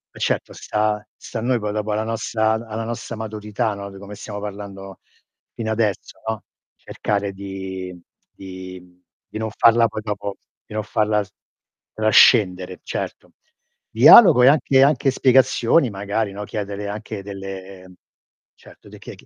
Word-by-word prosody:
Eh, -, -, -11 dB
certo, -, -, -1 dB
sta 105 Hz, 0 st, -1 dB
sta 115 Hz, -, -7 dB
a -, -, -5 dB
noi 125 Hz, +2 st, +1 dB
poi 105 Hz, -1 st, -3 dB
dopo, 105 Hz, 0 st, -2 dB
alla 110 Hz, +1 st, 0 dB
nostra 110 Hz, 0 st, -1 dB
a -, -, +2 dB
alla 110 Hz, 0 st, -4 dB
nostra 115 Hz, 0 st, -5 dB
maturità, 110 Hz, 0 st, -3 dB
no, 100 Hz, 0 st, -7 dB
di 100 Hz, -, -12 dB
come 100 Hz, +1 st, -10 dB
stiamo 105 Hz, 0 st, -7 dB
parlando 100 Hz, -1 st, -8 dB, 0.6 s
fino 110 Hz, -1 st, -3 dB
adesso, 105 Hz, -4 st, -2 dB
no, 110 Hz, -4 st, -4 dB, 0.3 s
cercare 100 Hz, -1 st, -3 dB
di 95 Hz, -2 st, -7 dB, 0.3 s
di 95 Hz, -1 st, -9 dB
mhmm, 90 Hz, 0 st, -22 dB, 0.3 s
di -, -, -8 dB
non 110 Hz, 0 st, -2 dB
farla 115 Hz, +1 st, +4 dB
poi 110 Hz, -, -6 dB
dopo 100 Hz, -1 st, -4 dB, 0.3 s
di 105 Hz, -, -10 dB
non 110 Hz, -, -1 dB
farla 105 Hz, -1 st, 0 dB
s 100 Hz, -, -18 dB, 0.6 s
trascendere, 95 Hz, -4 st, +4 dB
certo. -, -, -6 dB, 0.6 s
Dialogo 125 Hz, -, +8 dB
e -, -, +7 dB
anche 135 Hz, -2 st, +4 dB
anche 140 Hz, -1 st, +3 dB
spiegazioni 130 Hz, +1 st, +3 dB
magari, 100 Hz, +1 st, -2 dB
no, 105 Hz, +1 st, -6 dB
chiedere 100 Hz, -1 st, -5 dB
anche 105 Hz, -1 st, -6 dB
delle 95 Hz, -1 st, -9 dB, 0.6 s
certo, -, -, -18 dB
de -, -, -13 dB
che -, -, -10 dB
chi -, -, -19 dB
105 Hz, 160 wpm, -21 LUFS, 100-110 Hz, 0.6 s, Dialogo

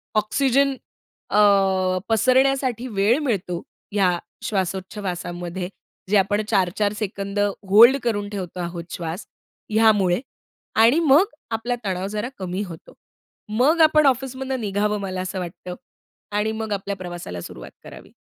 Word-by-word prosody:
Oxygen 270 Hz, +5 st, +2 dB, 0.6 s
अ, -, -, +4 dB, 0.7 s
पसरण्यासाठी 255 Hz, +1 st, +2 dB
वेळ 205 Hz, +6 st, +3 dB
मिळतो. 180 Hz, -8 st, -2 dB, 0.3 s
ह्या 190 Hz, -4 st, +2 dB, 0.3 s
श्वासोच्छवासामध्ये, 185 Hz, -2 st, -3 dB, 0.4 s
जे 210 Hz, -, +4 dB
आपण 200 Hz, +2 st, +2 dB
4-4 200 Hz, 0 st, +1 dB
सेकंद 200 Hz, -1 st, -4 dB, 0.3 s
होल्ड 235 Hz, +7 st, +8 dB
करून 205 Hz, -4 st, -1 dB
ठेवतो 185 Hz, -4 st, -6 dB
आहोत 170 Hz, -1 st, -4 dB
श्वास, 170 Hz, +3 st, -5 dB, 0.5 s
ह्यामुळे 210 Hz, -4 st, +4 dB, 0.6 s
आणि 245 Hz, +9 st, +5 dB
मग 315 Hz, +3 st, +5 dB, 0.3 s
आपला 230 Hz, +2 st, -1 dB
तणाव 190 Hz, 0 st, -2 dB
जरा 210 Hz, +4 st, -3 dB
कमी 185 Hz, 0 st, -3 dB
होतो. 170 Hz, -5 st, -11 dB, 0.7 s
मग 310 Hz, +6 st, +4 dB
आपण 310 Hz, -1 st, +5 dB
ऑफिसमधनं 265 Hz, 0 st, -1 dB
निघावं, 210 Hz, 0 st, 0 dB
मला 185 Hz, -1 st, -3 dB
असं 185 Hz, +1 st, -4 dB
वाटतं. 180 Hz, 0 st, -7 dB, 0.6 s
आणि 210 Hz, +1 st, 0 dB
मग 220 Hz, -1 st, -3 dB
आपल्या 200 Hz, 0 st, -3 dB
प्रवासाला 175 Hz, -, -7 dB
सुरुवात -, -, -10 dB
करावी. -, -, -12 dB
205 Hz, 120 wpm, -23 LUFS, 185-235 Hz, 0.7 s, होल्ड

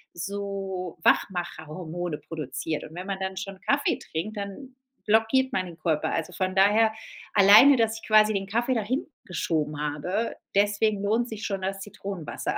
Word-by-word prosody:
so 195 Hz, -1 st, -4 dB
Wachmacherhormone 175 Hz, -2 st, -1 dB
produziert 155 Hz, 0 st, -4 dB
und 155 Hz, -, -10 dB
wenn 180 Hz, +3 st, -7 dB
man 195 Hz, -1 st, -3 dB
dann 190 Hz, 0 st, -3 dB
schon 190 Hz, 0 st, -6 dB
Kaffee 280 Hz, +7 st, +1 dB
trinkt, 210 Hz, +7 st, -5 dB
dann 205 Hz, +7 st, -7 dB, 0.3 s
blockiert 225 Hz, +5 st, +3 dB
man 190 Hz, -8 st, 0 dB
den 170 Hz, -2 st, -10 dB
Körper. 155 Hz, -1 st, 0 dB
Also, 165 Hz, +2 st, -2 dB
von 185 Hz, +1 st, -2 dB
daher, 215 Hz, +3 st, +4 dB, 0.4 s
alleine, 210 Hz, +8 st, +8 dB
dass 225 Hz, -1 st, +1 dB
ich -, -, -13 dB
quasi 215 Hz, 0 st, +6 dB
den 195 Hz, -1 st, -1 dB
Kaffee 235 Hz, +6 st, 0 dB
da 225 Hz, -, +1 dB
hingeschoben 170 Hz, -, -3 dB
habe, 175 Hz, +9 st, -2 dB, 0.2 s
deswegen 205 Hz, 0 st, +2 dB
lohnt 225 Hz, +4 st, +1 dB
sich 220 Hz, -2 st, -7 dB
schon 195 Hz, -2 st, -3 dB
das 195 Hz, +1 st, -2 dB
Zitronenwasser. 195 Hz, -4 st, -5 dB
195 Hz, 160 wpm, -26 LUFS, 175-215 Hz, 0.4 s, alleine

